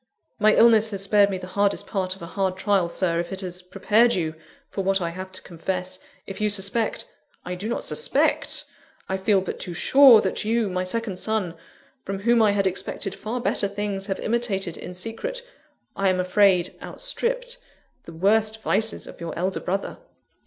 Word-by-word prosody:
"My 215 0 +5
illness 225 -1 +6
has 200 -2 -4
spared 200 0 +4
me 190 - -2
the 185 - -8
hardest 200 +2 0
part 185 -3 -2
of 190 - -12
a 170 - -9
hard 190 -2 0
trial, 190 -3 +1
Sir, 170 -1 0
if 175 - -4
it 190 0 -4
has 180 -1 -5
prepared 220 +6 +2
you 160 -3 -1 0.3
for 195 - -4
what 195 +1 +2
I 170 -2 -2
have 185 +2 -7
to 185 - -7
confess; 185 +2 -4 0.3
if 195 +1 -7
you 210 - +2
suspect 205 - 0 0.2
" - - -38
"I 180 - -4
do 195 +5 -5
not 235 - -2
suspect 465 - 0 0.4
I 190 - -1
feel 195 0 +2
but 185 - -5
too 175 - -5
sure, 265 - +7
that - - -1
you, 225 -1 +1
my 185 0 -1
second 195 0 -3
son, 215 -6 -1 0.5
from 195 0 -4
whom 235 +2 +4
I 215 - +5
had 200 -1 +1
expected 190 +1 -3
far 225 +5 -4
better 225 -4 0
things, 200 -1 -4
have 195 - -2
imitated 205 -7 -1
in 180 - -8
secret 230 - -4 0.5
I 195 -1 +2
am 185 0 +1
afraid, 185 -1 +3
outstripped - - -3 0.5
the 165 - -10
worst 215 +5 +1
vices 220 0 0
of - - -12
your 170 -1 -5
elder 185 +2 -1
brother." 195 +2 -3
195 Hz, 190 wpm, -24 LUFS, 185-220 Hz, 0.5 s, sure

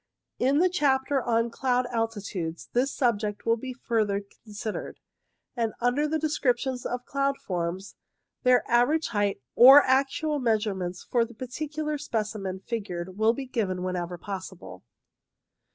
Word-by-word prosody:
In 270 +3 +3
the 360 +4 +5
chapter 275 -5 +1
on 230 -1 +1
cloud 250 0 +1
altitudes 200 -7 -3
this 255 +3 +2
subject 210 -5 -1
will 230 - +3
be 255 +3 -6
further 220 -5 -1 0.2
considered, 215 0 -6 0.6
and 230 -3 -1
under 245 +5 +1
the 315 +1 0
descriptions 265 -4 0
of 245 0 -4
cloud 275 0 0
forms 180 +2 -4 0.5
their 250 -1 +3
average 255 +7 +2
height 205 - -1
or 270 +4 +9
actual 280 +3 +1
measurements 205 -7 -1
for 240 -2 +1
the 235 0 -8
particular 300 +5 -4
specimen 210 -7 -3
figured 190 -4 -5
will 220 +1 +4
be 270 +2 -5
given 195 -8 -2
whenever 180 -1 -3
possible. 185 - -8
235 Hz, 135 wpm, -27 LUFS, 200-265 Hz, 0.6 s, or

